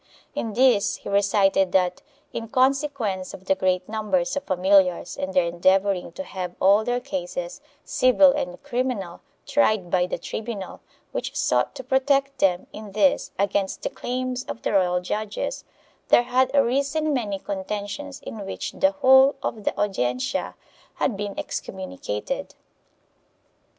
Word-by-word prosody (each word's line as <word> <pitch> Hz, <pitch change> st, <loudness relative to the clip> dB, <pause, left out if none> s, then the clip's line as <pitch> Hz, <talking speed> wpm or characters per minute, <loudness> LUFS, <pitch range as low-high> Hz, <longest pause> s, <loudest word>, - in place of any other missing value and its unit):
In 225 Hz, -2 st, -3 dB
this 235 Hz, -3 st, +3 dB
he -, -, -9 dB
recited 195 Hz, -2 st, +3 dB
that, 180 Hz, -1 st, +2 dB, 0.3 s
in 230 Hz, -1 st, -4 dB
con 260 Hz, +3 st, +4 dB
sequence 235 Hz, -11 st, -3 dB
of 190 Hz, -, -15 dB
the 190 Hz, -, +3 dB
great 185 Hz, -1 st, 0 dB
numbers 260 Hz, +6 st, -1 dB
of 285 Hz, -, -1 dB
familiars 185 Hz, -1 st, +3 dB
and 185 Hz, -, -3 dB
their 180 Hz, -2 st, +3 dB
endeavoring 185 Hz, +2 st, +1 dB
to 285 Hz, -, -5 dB
have 180 Hz, -8 st, -6 dB
all 200 Hz, +3 st, +5 dB
their 245 Hz, +2 st, 0 dB
cases, 180 Hz, -3 st, -5 dB, 0.2 s
civil 265 Hz, +2 st, +5 dB
and 180 Hz, -11 st, -4 dB
criminal, 240 Hz, -8 st, -3 dB, 0.2 s
tried 215 Hz, -11 st, +1 dB
by 180 Hz, -1 st, +2 dB
the -, -, -3 dB
tribunal, 210 Hz, +2 st, -6 dB, 0.3 s
which -, -, -4 dB
sought -, -, +1 dB
to 260 Hz, -, -7 dB
protect 275 Hz, +1 st, +1 dB
them 185 Hz, -4 st, +2 dB
in 210 Hz, -2 st, -9 dB
this 200 Hz, -3 st, +2 dB
against 200 Hz, 0 st, -1 dB
the -, -, -2 dB
claims 255 Hz, 0 st, -3 dB
of -, -, -7 dB
the -, -, -1 dB
royal 180 Hz, -2 st, +2 dB
judges, 210 Hz, -, -3 dB, 0.4 s
there 240 Hz, -, +5 dB
had 255 Hz, +1 st, +2 dB
arisen 280 Hz, +4 st, +2 dB
many 215 Hz, -7 st, -1 dB
contentions 205 Hz, +9 st, -5 dB
in 215 Hz, -2 st, -7 dB
which 195 Hz, -, -5 dB
the 285 Hz, 0 st, +2 dB
whole 265 Hz, -1 st, +6 dB
of 215 Hz, -3 st, -4 dB
the -, -, -1 dB
Audiencia 130 Hz, -4 st, -1 dB, 0.4 s
had 240 Hz, -, 0 dB
been 200 Hz, 0 st, -5 dB
excommunicated. 105 Hz, -, -5 dB
205 Hz, 145 wpm, -24 LUFS, 185-255 Hz, 0.4 s, whole